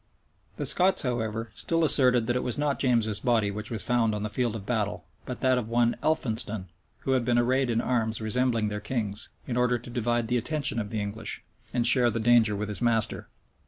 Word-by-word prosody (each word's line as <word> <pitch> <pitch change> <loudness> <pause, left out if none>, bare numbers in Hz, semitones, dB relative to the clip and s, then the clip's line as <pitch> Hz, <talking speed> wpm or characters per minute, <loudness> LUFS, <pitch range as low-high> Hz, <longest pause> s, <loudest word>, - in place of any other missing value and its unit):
The - - -3
Scots, 190 +1 +3
however, 115 -3 -3
still 165 +6 +1
asserted 125 -5 +6
that 120 +1 -1
it 125 - 0
was 125 - -3
not 145 -1 -1
James's 115 -5 +1
body 115 -5 +1
which 105 +2 -5
was 115 -3 -2
found 115 -3 +1
on 105 - -4
the 105 - -4
field 120 -2 -1
of 100 -3 -7
battle, 105 -6 -3 0.2
but 125 - -6
that 130 -1 +2
of 115 - -6
one 120 0 +1
Elphinston, 110 - 0 0.3
who 135 - -2
had 130 -2 +1
been 120 0 +1
arrayed 130 +2 +1
in 115 0 0
arms 115 -3 -1
resembling 115 0 0
their 105 0 -4
king's, 105 -2 -2 0.2
in 120 - -4
order 125 0 +2
to 120 +1 -12
divide 120 -1 -1
the 125 +2 0
attention 140 +1 -1
of 105 -2 -4
the 110 - -3
English, 105 +2 -4 0.3
and 120 -1 -1
share 125 0 +6
the 115 0 -3
danger 115 -2 +3
with 105 +1 -4
his 105 - -3
master. 115 -3 0
120 Hz, 215 wpm, -26 LUFS, 110-125 Hz, 0.3 s, asserted